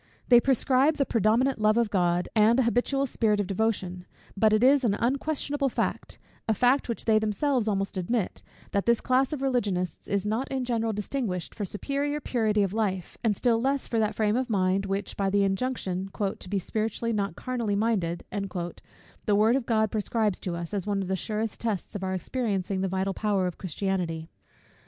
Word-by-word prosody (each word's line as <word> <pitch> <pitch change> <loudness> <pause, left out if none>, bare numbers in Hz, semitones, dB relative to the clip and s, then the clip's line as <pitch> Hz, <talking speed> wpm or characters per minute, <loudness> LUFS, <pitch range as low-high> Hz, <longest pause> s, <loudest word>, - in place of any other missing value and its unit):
They 240 -1 +9
prescribe 270 +3 +3
the 280 -2 +1
predominant 230 +3 +2
love 215 +1 +4
of 230 -3 +2
God, 175 -2 +1
and 220 +2 +5
an 260 - +3
habitual 245 +4 +1
spirit 220 -5 +1
of 205 - +1
devotion: 185 -3 -2 0.3
but 215 +2 +4
it 215 +2 +3
is 275 +1 +5
an 210 -4 +2
unquestionable 280 +3 0
fact; - - -3 0.3
a 220 - +3
fact 250 +4 +2
which 235 - -3
they 220 -1 +4
themselves 220 +3 0
almost 195 -2 -1
admit, 190 +2 -1 0.3
that 200 +2 -1
this 235 -1 +4
class 260 +1 +2
of 285 -3 -3
religionists 205 -9 -1
is 200 0 -1
not 220 +6 -1
in 260 -2 -2
general 230 -2 0
distinguished 210 -4 -3
for 210 - -4
superior 280 +9 -2
purity 220 -6 +1
of 195 -1 -1
life; 195 -5 -2
and 215 -4 +1
still 230 -2 +2
less 275 +2 0
for 230 - -1
that 215 -1 0
frame 215 -1 +1
of 255 0 -1
mind, 195 -1 +1
which, 195 +1 -3
by 195 -1 0
the 200 +1 +3
injunction 195 -3 -1 0.3
"to 185 - -9
be 200 - 0
spiritually, 220 +4 -2
not 200 -5 -1
carnally, 235 -5 -2
minded," 200 -6 0 1.0
the 205 - +4
word 220 +4 +4
of 265 -3 -1
God 220 -2 +2
prescribes 215 -2 0
to 175 -2 -4
us, 170 +2 -6
as 200 -1 -2
one 200 -1 0
of 185 - -6
the 190 - +1
surest 215 +2 -3
tests 215 -5 -3
of 195 - -4
our 190 0 -1
experiencing 195 -2 -2
the 190 - 0
vital 190 +1 -1
power 200 -3 0
of 180 - -4
Christianity. 175 -3 -2
215 Hz, 195 wpm, -27 LUFS, 195-245 Hz, 1.0 s, They